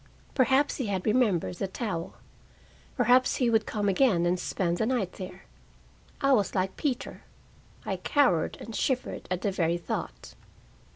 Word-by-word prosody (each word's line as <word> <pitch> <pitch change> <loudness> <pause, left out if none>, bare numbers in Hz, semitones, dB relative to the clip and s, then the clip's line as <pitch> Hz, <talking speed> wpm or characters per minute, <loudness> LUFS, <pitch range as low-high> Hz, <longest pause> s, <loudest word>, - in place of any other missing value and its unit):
Perhaps 265 +2 +3
he 255 - -2
had 190 -2 -2
remembered 210 -7 +1
the 195 - -2
towel. 190 -5 -4 0.8
Perhaps 255 +1 +4
he 245 -3 +1
would 220 -1 +2
come 205 -1 -1
again 195 -4 +3
and 175 +1 +1
spend 175 -2 -1
the 220 - +1
night 235 -8 0
there. 185 0 -9 0.8
I 275 -1 +4
was 205 -7 +1
like 190 0 0
Peter: 265 -5 -3 0.6
I - - -2
cowered 255 - +2
and 225 0 -8
shivered 255 -2 -2
at 180 0 -2
the 200 - +1
very 170 -2 +1
thought. - - -5
205 Hz, 155 wpm, -28 LUFS, 180-250 Hz, 0.8 s, Perhaps